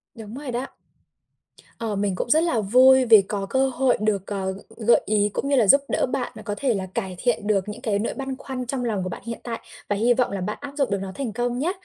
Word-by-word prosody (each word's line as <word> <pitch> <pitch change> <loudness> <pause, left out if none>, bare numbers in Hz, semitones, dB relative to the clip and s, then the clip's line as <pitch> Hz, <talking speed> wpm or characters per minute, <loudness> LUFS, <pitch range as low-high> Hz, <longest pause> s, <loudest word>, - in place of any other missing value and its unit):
Đúng 220 0 -9
rồi 280 -2 -6
đó. 245 +3 -3 1.1
Ờ, 220 -3 -3
mình 200 -1 -1
cũng 235 - -3
rất 315 +5 +4
là 245 -10 +1
vui 255 +5 +6
vì 220 -3 +8
có 195 0 -4
cơ 265 +5 +1
hội 260 0 +1
được, 205 -3 0
ờ, 190 -2 -2
g 195 - -10 0.3
gợi 235 - +6
ý 210 -1 +2
cũng 275 - -2
như 280 - +3
là 225 -6 +4
giúp 275 +4 +7
đỡ - - +1
bạn 255 -1 -3
là 215 - -10
có 210 - -3
thể 260 -4 +1
là 190 -2 -3
cải 190 -2 -3
thiện 235 -4 0
được 205 -1 +1
những 230 +4 -7
cái 210 -5 0
nỗi 230 - -2
băn 270 -1 -5
khoăn 255 -2 -5
trong 250 0 -3
lòng 210 -5 -1
của 185 - -3
bạn - - -7
hiện 230 0 -5
tại. 230 -2 -4 0.3
Và 205 - +1
hy 235 +4 +3
vọng 245 -3 0
là 195 - -3
bạn 210 +4 -3
áp 285 -1 -7
dụng 275 -3 +1
được 200 - 0
nó 195 -1 -5
thành 250 -7 -4
công 245 +1 -1
nhá. 335 +6 0
230 Hz, 275 wpm, -24 LUFS, 205-260 Hz, 1.1 s, vì